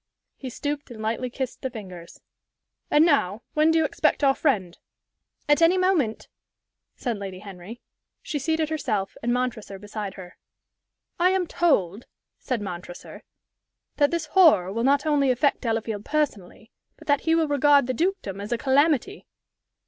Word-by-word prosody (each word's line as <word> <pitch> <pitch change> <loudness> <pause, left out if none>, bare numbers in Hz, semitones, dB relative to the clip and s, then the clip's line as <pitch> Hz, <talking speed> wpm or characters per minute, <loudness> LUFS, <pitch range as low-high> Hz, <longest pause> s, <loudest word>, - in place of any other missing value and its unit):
He 265 - -7
stooped 290 +3 -4
and 235 -3 -10
lightly 225 +3 -2
kissed 260 0 -5
the 260 - -3
fingers. 185 -8 -10 0.7
"And 300 +2 +5
now, 230 - +1
when 305 +1 +3
do 325 - +3
you 320 - +3
expect 305 0 0
our 270 -1 +5
friend?" 200 - -1 0.7
"At 295 +2 +3
any 335 +3 +5
moment," 355 - 0 0.7
said 235 -5 -3
Lady 195 -2 -6
Henry. 200 +3 -10 0.4
She 295 - -3
seated 320 +2 -1
herself, 215 -11 -2
and 240 - -1
Montresor 240 -5 -2
beside 205 0 -6
her. 180 -1 -11 0.8
"I 360 +1 +4
am 375 -1 +1
told," 230 - 0 0.3
said 245 -5 -3
Montresor, 175 -2 -8 0.8
"that 290 -1 +4
this 335 -2 -2
horror 300 - +4
will 230 +2 -2
not 280 +3 +2
only 290 -3 +2
affect 255 +3 +1
Delafield 225 -3 -2
personally, 250 -8 -3 0.3
but - - -16
that 285 -1 +2
he 325 0 +2
will 325 -1 +2
regard 285 -1 +4
the 255 - -2
dukedom 285 - -2
as 205 - -7
a 240 - +1
calamity." 290 - +1
255 Hz, 155 wpm, -24 LUFS, 210-305 Hz, 0.8 s, And